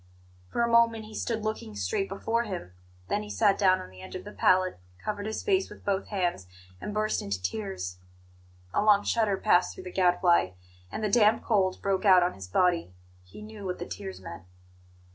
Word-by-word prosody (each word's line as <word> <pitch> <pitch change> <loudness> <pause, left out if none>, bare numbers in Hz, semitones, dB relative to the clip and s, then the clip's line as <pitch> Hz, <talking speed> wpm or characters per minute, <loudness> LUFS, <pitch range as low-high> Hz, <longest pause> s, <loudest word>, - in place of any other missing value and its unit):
For 235 - 0
a - - +2
moment 230 -1 +3
he 215 - -12
stood 225 0 -2
looking 215 - -4
straight 100 - -1
before 225 +4 -1
him; 180 - -6 0.4
then 205 - 0
he 210 - -8
sat 205 -2 +3
down 185 -2 +4
on 90 - -9
the 95 0 -13
edge 95 - -9
of 185 - -6
the 210 - -9
pallet, 185 - +2 0.2
covered 205 - -4
his 220 - -4
face 385 -2 +1
with - - -13
both 195 -1 0
hands, 175 - -2 0.3
and - - -4
burst 215 +1 0
into 100 -2 -3
tears. 90 -1 -4 0.7
A - - +2
long 205 -1 +5
shudder 215 -4 +1
passed 185 -3 +3
through 185 - -9
the 180 - -7
Gadfly, 175 - +3 0.4
and 220 - -4
the - - +2
damp 215 +1 +4
cold 190 -5 +1
broke 195 -1 0
out 185 -3 +7
on 175 - 0
his 95 -1 -9
body. 170 - +1 0.3
He 90 - -12
knew 215 -1 -10
what 180 -1 -3
the - - -5
tears 95 0 -7
meant. 85 -2 -9
190 Hz, 200 wpm, -28 LUFS, -, 0.7 s, out